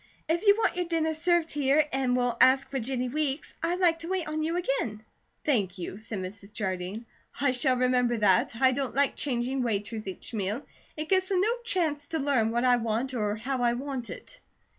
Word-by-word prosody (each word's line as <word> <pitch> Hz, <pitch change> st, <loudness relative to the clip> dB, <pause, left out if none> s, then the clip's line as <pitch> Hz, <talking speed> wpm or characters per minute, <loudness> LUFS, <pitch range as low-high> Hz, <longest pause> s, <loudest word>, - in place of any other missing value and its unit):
If 340 Hz, +6 st, 0 dB
you 405 Hz, -, +8 dB
want 450 Hz, -, +1 dB
your 360 Hz, -, 0 dB
dinner 320 Hz, -2 st, 0 dB
served 335 Hz, 0 st, +2 dB
here 290 Hz, +1 st, +3 dB
and 260 Hz, -2 st, +1 dB
will 245 Hz, -1 st, +1 dB
ask 265 Hz, +1 st, +5 dB
for 270 Hz, -, -1 dB
Jennie 255 Hz, +1 st, -2 dB
Weeks, 295 Hz, +1 st, -2 dB
I'd 345 Hz, +2 st, 0 dB
like 335 Hz, -3 st, +3 dB
to 335 Hz, -, -5 dB
wait 370 Hz, -3 st, -1 dB
on 310 Hz, 0 st, -2 dB
you 325 Hz, +2 st, -1 dB
again." 235 Hz, -10 st, -2 dB, 0.4 s
"Thank 200 Hz, -10 st, +1 dB
you," 185 Hz, +2 st, -6 dB
said 220 Hz, -1 st, -4 dB
Mrs. 195 Hz, +2 st, -7 dB
Jardine, 190 Hz, +1 st, -3 dB, 0.3 s
"I 280 Hz, -2 st, +3 dB
shall 255 Hz, 0 st, +1 dB
remember 250 Hz, -1 st, +2 dB
that. 220 Hz, +5 st, +3 dB
I 260 Hz, -1 st, +5 dB
don't 260 Hz, -2 st, -3 dB
like 280 Hz, 0 st, +2 dB
changing 255 Hz, 0 st, -1 dB
waiters 215 Hz, -2 st, -2 dB
each 190 Hz, +5 st, -7 dB
meal. 210 Hz, +5 st, -2 dB, 0.3 s
It 305 Hz, +1 st, -4 dB
gives 375 Hz, -1 st, +2 dB
them 380 Hz, -2 st, +2 dB
no 445 Hz, +4 st, +2 dB
chance 315 Hz, -9 st, 0 dB
to 320 Hz, -, -2 dB
learn 270 Hz, -6 st, +2 dB
what 235 Hz, +2 st, 0 dB
I 250 Hz, -1 st, +5 dB
want 230 Hz, +3 st, -1 dB
or 210 Hz, -3 st, -1 dB
how 250 Hz, +4 st, -3 dB
I 240 Hz, -1 st, +3 dB
want 260 Hz, -1 st, -4 dB
it." -, -, -10 dB
260 Hz, 205 wpm, -28 LUFS, 230-310 Hz, 0.4 s, you